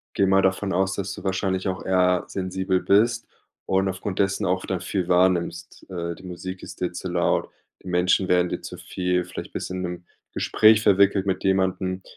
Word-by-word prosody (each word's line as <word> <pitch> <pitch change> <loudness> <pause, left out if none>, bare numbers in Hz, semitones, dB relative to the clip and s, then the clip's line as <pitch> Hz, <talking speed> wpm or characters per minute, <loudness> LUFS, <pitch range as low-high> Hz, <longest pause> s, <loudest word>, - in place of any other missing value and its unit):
Gehe 100 - +3
mal 95 0 +4
davon 95 +1 0
aus, 95 +2 +1
dass 95 -1 -4
du - - -9
wahrscheinlich 95 0 -1
auch 95 0 -3
eher 90 -1 +2
sensibel 95 0 -1
bist 115 +5 +2 0.4
und 95 0 +1
aufgrund 95 +1 -4
dessen 95 +1 +1
auch 95 0 0
dann 95 -2 -2
viel 95 -1 -2
wahrnimmst. 90 -1 0
Äh, 85 -2 -4
die - - -16
Musik 95 +1 -7
ist - - -10
dir 90 -1 -1
zu 90 +1 -5
laut. 85 0 0 0.3
Die - - -10
Menschen 90 +1 +2
werden 90 0 +3
dir - - -4
zu - - -8
viel, 90 -1 -1
vielleicht 90 - -8
bist - - -5
in 95 0 -3
'nem 90 -1 -5 0.3
Gespräch 110 0 +4
verwickelt 100 -1 +4
mit 95 -1 -1
jemandem, 95 -1 0
95 Hz, 190 wpm, -24 LUFS, 90-95 Hz, 0.4 s, mal